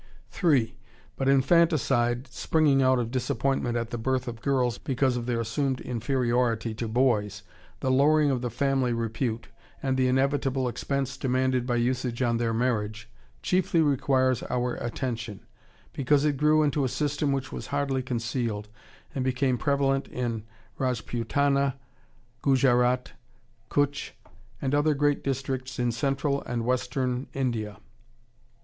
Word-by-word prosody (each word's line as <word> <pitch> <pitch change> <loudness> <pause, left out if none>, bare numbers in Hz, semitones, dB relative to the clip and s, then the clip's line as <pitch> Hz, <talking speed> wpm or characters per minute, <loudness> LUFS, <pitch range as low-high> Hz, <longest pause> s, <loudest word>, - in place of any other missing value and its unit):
3. 130 - +2 0.4
But 135 0 0
infanticide, 135 -4 +3
springing 140 +1 +2
out 130 0 +4
of 120 -2 -2
disappointment 125 -1 0
at 115 0 -3
the 120 - -3
birth 130 +2 -1
of 115 -1 -6
girls, 130 -4 +1
because 130 -1 0
of 120 -1 -3
their 120 -2 0
assumed 130 +3 -1
inferiority 120 -2 0
to 115 +1 -4
boys, 110 -4 +1 0.4
the 130 - +1
lowering 145 +2 +4
of 125 -2 -1
the 125 - -2
family 130 0 +1
repute, 115 0 -2 0.3
and 130 -1 0
the 130 -1 +3
inevitable 135 0 +1
expense 135 +2 -2
demanded 130 -1 0
by 120 - +1
usage 125 0 0
on 120 -1 +2
their 115 -1 0
marriage, 110 -2 -1 0.3
chiefly 180 -2 +2
requires 130 -4 +2
our 125 -1 0
attention; 115 -4 -4 0.5
because 140 +2 +2
it 150 -2 +2
grew 150 +2 +4
into 145 -1 +1
a 130 - +1
system 145 +1 -1
which 135 -1 -2
was - - -6
hardly 140 -2 -1
concealed, 115 -4 -3 0.4
and 130 - -2
became 130 0 +1
prevalent 135 +1 +1
in 120 -3 -3 0.4
Rajputana, 135 +3 0 0.7
Gujarat, 125 -2 +3 0.6
Cutch, 145 0 0 0.4
and 135 0 -2
other 145 +1 +3
great 145 0 +1
districts 130 -1 -3
in 120 -1 +1
Central 140 +4 0
and 120 -1 -3
Western 125 +1 -1
India.... 115 -6 -2
130 Hz, 135 wpm, -27 LUFS, 120-140 Hz, 0.7 s, out